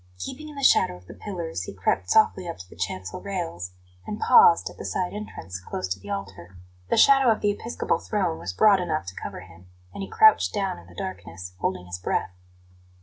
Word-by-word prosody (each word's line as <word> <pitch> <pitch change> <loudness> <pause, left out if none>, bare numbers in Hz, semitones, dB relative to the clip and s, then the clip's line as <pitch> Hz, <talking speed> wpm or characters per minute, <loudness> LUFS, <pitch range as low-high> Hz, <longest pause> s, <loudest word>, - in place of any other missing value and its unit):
Keeping 275 - -7
in 300 - -11
the 280 - -6
shadow 90 - +5
of 90 - -19
the - - -11
pillars, 170 - -5
he - - -8
crept 95 0 0
softly 190 -4 +3
up 170 - -5
to 90 - -11
the - - -15
chancel 95 +2 -4
rails, 165 - -4 0.3
and 210 - -4
paused 450 -2 +6
at - - -8
the - - -6
side 180 -1 -2
entrance, 150 - -7
close 95 0 -4
to 90 +1 -2
the 100 +2 -12
altar. 95 -3 -6 0.3
The - - +2
shadow 270 -2 +6
of 220 - 0
the 205 - +3
episcopal 225 +3 -2
throne 185 -6 -1
was 90 - -4
broad 200 - +5
enough 165 - -2
to 95 - -13
cover - - -6
him, 90 -1 -16 0.3
and - - -6
he 195 - -5
crouched 435 - +5
down 195 - -1
in 85 - -16
the 90 - -16
darkness, 90 -1 -7
holding 90 -1 -2
his 90 0 -6
breath. 90 - -1
100 Hz, 215 wpm, -25 LUFS, -, 0.3 s, paused